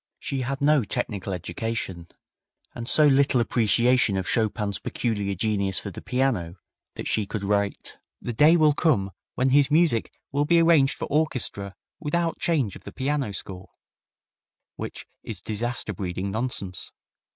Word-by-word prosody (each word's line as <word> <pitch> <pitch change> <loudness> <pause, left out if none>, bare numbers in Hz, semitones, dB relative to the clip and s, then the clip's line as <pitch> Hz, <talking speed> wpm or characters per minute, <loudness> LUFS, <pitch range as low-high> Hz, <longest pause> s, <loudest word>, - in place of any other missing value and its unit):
She 135 -1 -3
had 135 +2 -3
no 145 -2 +4
technical 105 -3 -3
education, 90 -1 -4 0.7
and 120 0 -4
so 155 - +5
little 135 -2 +4
appreciation 120 -1 +3
of 95 - -2
Chopin's 105 -4 0
peculiar 105 -4 -2
genius 100 -2 0
for 100 - -6
the - - -9
piano 125 -10 -1 0.4
that - - -5
she 105 -2 0
could 105 -1 -4
write, 100 0 -1 0.2
"The 120 - -4
day 155 +8 +6
will 155 -2 +5
come 115 - +1 0.2
when 130 +1 +2
his 140 0 +5
music 155 -7 +2 0.2
will 145 +1 +1
be 170 +2 +4
arranged 165 -5 +4
for - - -3
orchestra 125 -10 -1 0.2
without 165 +1 -1
change 145 - 0
of - - -12
the - - -8
piano 140 -3 -1
score;" 95 -1 -7 1.1
which - - -7 0.2
is 105 -5 -6
disaster 110 +3 -2
breeding 95 +1 -4
nonsense. 100 -5 -4
115 Hz, 150 wpm, -25 LUFS, 100-140 Hz, 1.1 s, day